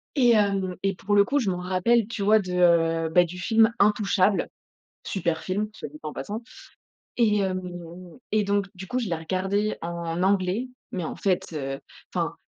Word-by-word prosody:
Et 250 -4 +5
hem, 195 -3 +1
et 195 0 +1
pour 205 +3 -1
le 200 0 +6
coup, 285 +7 +1
je 225 -8 0
m'en 180 - -2
rappelle, 190 +5 +2
tu 220 -3 -4
vois 215 +2 +5
de 185 -3 -4
heu 165 -2 +3
bah 175 +1 +5
du 180 +2 -8
film 225 +4 +4
Intouchables- 205 -1 +2 0.6
super 170 -4 -1
film, 205 +3 -2
soit 185 - -7
dit 150 +2 -13
en 155 -1 -5
passant- 215 +3 -5 0.7
et 215 -3 +3
hem 185 -1 -1 0.7
et 215 -1 +3
donc, 200 0 +1
du 190 +1 -8
coup 250 - -2
je 235 - -2
l'ai 170 - 0
regardé 190 +5 -1
en 170 0 -3
anglais, 195 +5 +1 0.2
mais 180 -3 -3
en - - -5
fait, 185 -3 -1
heu 135 -3 -4 0.3
enfin, - - -1
190 Hz, 190 wpm, -25 LUFS, 180-210 Hz, 0.7 s, le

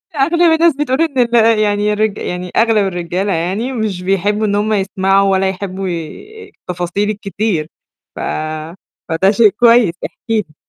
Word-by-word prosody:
أغلب 315 +5 +1
الناس 325 -1 +3
بتقول 280 0 -1
إن 315 -5 -1
ال 230 -2 +3
يعني 210 0 +1
الرج 215 0 0
يعني 180 0 -5
أغلب 220 -3 +3
الرجالة 180 +2 -2
يعني 190 +10 -2
مش 215 -6 -3
بيحبوا 200 +3 0
إن 200 -1 0
هُم 210 +1 0
يسمعوا 195 0 +1
ولا 190 0 +2
يحبوا 190 0 -5
ي 410 - -8
التفاصيل 180 +3 -3
الكتير، 205 -5 -2 0.5
ف - - -8 0.9
فده 165 +4 +2
شيء 215 +1 +5
كويس، 230 -3 +4
احكي - - -9 0.2
لي. 150 -6 -18
205 Hz, 150 wpm, -16 LUFS, 190-230 Hz, 0.9 s, شيء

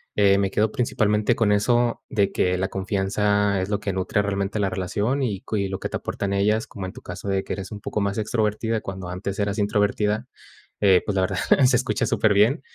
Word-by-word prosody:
eh, 100 -1 +4
me 100 -1 0
quedo 110 +1 +1
principalmente 110 -2 +1
con 110 -3 +2
eso 120 +3 +2
de 100 -3 +1
que 90 0 +1
la 95 - 0
confianza 100 +1 0
es 95 - -5
lo 105 - 0
que 100 -2 -3
nutre 95 +2 0
realmente 100 +1 -2
la 100 -1 +1
relación 105 +9 -1
y 100 -6 -2
cui 100 -3 -2
lo 95 - -4
que - - -4
te - - -2
aportan 100 -1 -3
ellas, 105 +3 +1
como 95 -2 -7
en 95 - -7
tu - - -11
caso 90 +3 -8
de 95 -1 0
que - - -4
eres 95 0 -6
un 105 -1 -7
poco 105 - -3
más 100 +1 -1
extrovertida 110 +1 0
cuando 95 -2 -6
antes 95 +2 -4
eras 100 0 -1
introvertida, 105 +2 0 0.5
eh, 95 -3 +5
pues, 105 - -2
la 95 - +2
verdad, 95 - -1 0.3
se 125 -1 +4
escucha 125 +2 0
súper 110 -2 +2
bien. 110 +7 +3
100 Hz, 220 wpm, -24 LUFS, 95-110 Hz, 0.5 s, eh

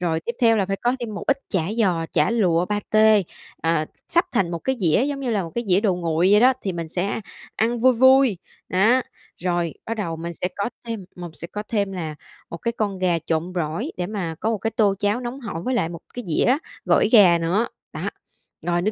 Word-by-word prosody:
Rồi 165 -2 0
tiếp 235 - -4
theo 230 -2 +5
là 195 -3 +1
phải 195 - -1
có 245 +5 0
thêm 225 -3 -4
một - - -5
ít 275 0 +2
chả 185 -5 0 0.2
giò, 175 -6 +2
chả 150 +5 +3
lụa, 180 -7 +2
pa 210 0 -1
tê, 215 -1 +5 0.4
à, 165 -1 +1
s - - -28
sắp 345 +1 +4
thành 195 -8 +1
một 170 - -3
cái 265 +10 -1
dĩa 175 +6 +3
giống 280 -1 -3
như 255 -3 -2
là 205 -4 +1
một 165 - -7
cái 235 0 -2
dĩa 185 +2 +4
đồ 200 -5 +2
nguội 170 +1 +1
vậy 210 - +6
đó, 255 +2 +6
thì 190 - -2
mình 170 -2 -5
sẽ 190 +6 -2 0.4
ăn 230 +1 0
vui 260 +1 +6
vui, 260 -4 +5 0.3
đó. 225 +8 +3 0.4
Rồi 175 -3 0
bắt 230 - -3
đầu 170 -7 -3
mình 170 +1 -5
sẽ 180 +2 -3
có 200 +4 -1
thêm 225 -4 -5
mồng 175 -2 -7
sẽ 170 - -8
có 210 +4 -5
thêm 200 -3 0
là 160 -4 -4 0.4
một 170 - -5
cái 235 +6 -2
con 205 -5 -2
gà 180 -2 +2
trộn 165 +2 -2
gỏi 160 -2 -2
để 180 -1 -2
mà 185 -6 -3
có 220 - 0
một 225 - -1
cái 225 +3 -2
tô 205 -3 +2
cháo 205 +4 0
nóng 245 +2 -5
hổi 200 -9 -5
với 255 +6 -1
lại 165 -8 +1
một 170 -1 -8
cái 245 - -5
dĩa 245 - +3 0.3
gỏi - - +3
gà 185 -7 +7
nữa, 185 +8 +1 0.3
đó, - - -3 0.5
rồi 175 0 0
nước 215 +4 +1
195 Hz, 245 wpm, -23 LUFS, 170-230 Hz, 0.5 s, gà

